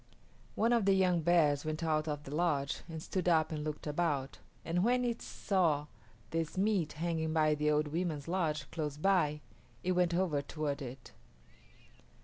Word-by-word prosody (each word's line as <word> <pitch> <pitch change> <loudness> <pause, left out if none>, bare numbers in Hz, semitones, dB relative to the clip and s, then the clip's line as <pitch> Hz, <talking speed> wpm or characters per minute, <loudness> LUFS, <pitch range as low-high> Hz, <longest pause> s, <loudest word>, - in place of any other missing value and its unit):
One 230 +3 +3
of 230 -4 +2
the 195 -1 +5
young 180 -3 +3
bears 155 -4 +3
went 155 +1 -3
out 155 -1 +1
of 145 -1 -3
the 140 - -8
lodge 150 -4 0
and 160 -1 -6
stood 180 -2 -1
up 160 -2 +3
and 150 -1 -3
looked 150 -1 -5
about, 150 -3 -1 0.3
and 175 +2 +1
when 250 +2 +2
it 235 -1 -2
saw 165 -7 0 0.5
this 165 +1 -2
meat 195 -5 +1
hanging 160 0 -1
by 155 -1 +3
the 150 0 +1
old 150 0 +2
women's 160 -2 -2
lodge 160 -5 -1
close 150 -3 -3
by, 155 -4 +2 0.4
it 185 - +1
went 180 -1 +2
over 170 -6 +1
toward 145 0 -3
it. 130 0 -8
160 Hz, 170 wpm, -33 LUFS, 150-180 Hz, 0.5 s, the